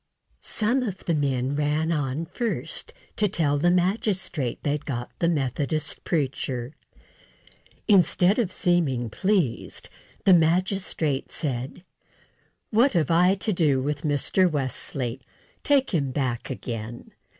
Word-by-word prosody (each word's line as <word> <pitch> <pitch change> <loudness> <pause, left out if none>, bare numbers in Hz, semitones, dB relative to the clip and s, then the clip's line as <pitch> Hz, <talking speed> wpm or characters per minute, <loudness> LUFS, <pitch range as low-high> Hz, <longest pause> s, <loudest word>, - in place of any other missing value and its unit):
Some 235 +5 +1
of 200 -7 -4
the 170 - +1
men 135 -2 0
ran 150 +2 0
on 150 0 -1
first 230 +7 -4 0.3
to 210 - +3
tell 145 -6 +1
the 175 +4 +3
magistrate 180 - 0
they'd 145 0 -1
got 120 -4 -4
the 170 - +2
Methodist 145 0 -1
preacher. 135 -4 -2 1.1
Instead 190 +1 +4
of 205 -6 0
seeming 145 - +1
pleased, 185 - -1 0.4
the 190 - +7
magistrate 170 -4 +1
said: 135 +3 -3 0.9
"What 240 +5 +4
have 165 -4 +1
I 180 +3 +5
to 200 +2 -1
do 150 -6 +2
with 145 +2 -2
Mr. 155 +5 +2
Wesley? 130 -3 -3 0.4
Take 280 -2 +2
him 145 -8 0
back 130 -3 -2
again." 120 -3 -6
155 Hz, 120 wpm, -25 LUFS, 135-185 Hz, 1.1 s, the